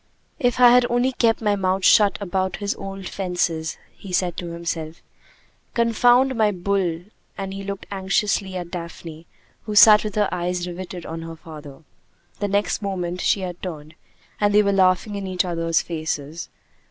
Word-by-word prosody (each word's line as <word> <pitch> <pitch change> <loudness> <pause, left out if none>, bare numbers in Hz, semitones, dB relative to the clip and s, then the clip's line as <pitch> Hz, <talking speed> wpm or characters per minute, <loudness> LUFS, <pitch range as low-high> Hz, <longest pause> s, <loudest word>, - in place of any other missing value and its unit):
"If 245 -3 +1
I 245 -1 +8
had 245 0 +5
only 245 +2 +2
kept 230 -3 +1
my 205 -1 +2
mouth 190 -1 0
shut 205 -4 +5
about 190 -1 -2
his 205 -1 -2
old 195 -1 -7
fences," 175 -4 -2 0.2
he 195 - -11
said 180 -1 0
to 175 - -5
himself. 170 -1 -5 0.8
"Confound 245 +3 +4
my 215 -2 +3
bull!" 180 -3 -1 0.4
and 195 -1 -5
he 195 - -6
looked 200 0 -6
anxiously 195 0 0
at 175 -1 -6
Daphne, 170 -2 -8 0.4
who 210 - -3
sat 210 0 +8
with 210 -2 -5
her 210 -1 +2
eyes 175 0 -2
riveted 180 0 -7
on 165 0 -6
her 165 0 -7
father. 155 -2 -12 0.6
The 205 - -1
next 200 +1 0
moment 180 -3 -3
she 200 - +2
had 180 -1 -6
turned, 155 -4 -7 0.5
and 205 0 +2
they 210 - +6
were 200 - +2
laughing 190 +2 +2
in 200 -1 -4
each 185 0 0
other's 165 -1 0
faces. 160 -1 -4
190 Hz, 170 wpm, -22 LUFS, 170-205 Hz, 0.8 s, I